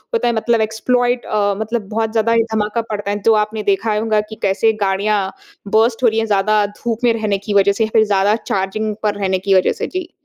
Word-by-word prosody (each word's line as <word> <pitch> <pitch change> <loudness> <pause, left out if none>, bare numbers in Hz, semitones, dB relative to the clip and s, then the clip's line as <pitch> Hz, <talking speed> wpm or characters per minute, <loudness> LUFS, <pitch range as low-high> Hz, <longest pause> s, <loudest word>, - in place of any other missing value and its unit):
होता 455 - +1
है, 240 - +1
मतलब 225 0 +1
एक्सप्लॉइट 245 +3 0
अ, 205 -1 +1
मतलब 220 -1 -3
बहुत 220 0 -1
ज़्यादा 230 0 +1
ही 230 0 +3
धमाका 215 +1 0
पड़ता 205 -1 -3
है, 205 - -1
जो 225 - +5
आपने 215 0 -6
देखा 215 +2 0
ही 210 - 0
होगा 215 -1 +1
कि 220 - -8
कैसे 205 +3 +2
गाड़ियाँ 200 +2 +1 0.6
बर्स्ट 225 +2 +2
हो - - +6
रही 220 +1 -1
हैं 225 - 0
ज़्यादा 210 +1 +2
धूप 230 +3 -5
में 235 - +4
रहने 215 -3 -1
की 210 - -1
वजह 200 0 +4
से 200 +3 0
या - - -6
फिर 220 - +5
ज़्यादा 205 +1 +2
चार्जिंग 205 +3 -2
पर 210 -1 0
रहने 190 -1 0
की 195 +1 0
वजह 185 - +3
से। - - -1
जी। 365 -1 -5
215 Hz, 240 wpm, -18 LUFS, 205-225 Hz, 0.6 s, हो